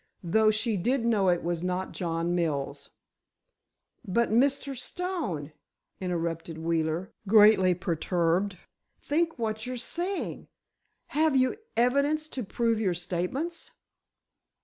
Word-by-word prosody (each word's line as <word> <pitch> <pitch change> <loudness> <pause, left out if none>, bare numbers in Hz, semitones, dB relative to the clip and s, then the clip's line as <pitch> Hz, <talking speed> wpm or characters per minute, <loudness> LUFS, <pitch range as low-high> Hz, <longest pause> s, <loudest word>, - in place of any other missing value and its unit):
Though 215 +6 +4
she 215 0 +1
did 240 +6 0
know 210 -5 +3
it 175 -1 +1
was 170 -1 -1
not 180 +1 -2
John 170 -1 -2
Mills." 140 -4 -2 1.1
"But—Mr. 240 +6 +2
Stone——" 255 - -4 0.5
interrupted 170 -2 -3
Wheeler, 165 +3 -1
greatly 205 -3 +6
perturbed, 180 +1 0 0.4
"think 325 +2 0
what 220 -1 -2
you're 255 0 -3
saying! 350 +10 -3 0.6
Have 310 -1 +2
you 255 -1 +3 0.2
evidence 280 +6 +2
to 255 - -4
prove 230 +2 0
your 190 -5 +1
statements?" 180 - -3
205 Hz, 105 wpm, -28 LUFS, 170-255 Hz, 1.1 s, greatly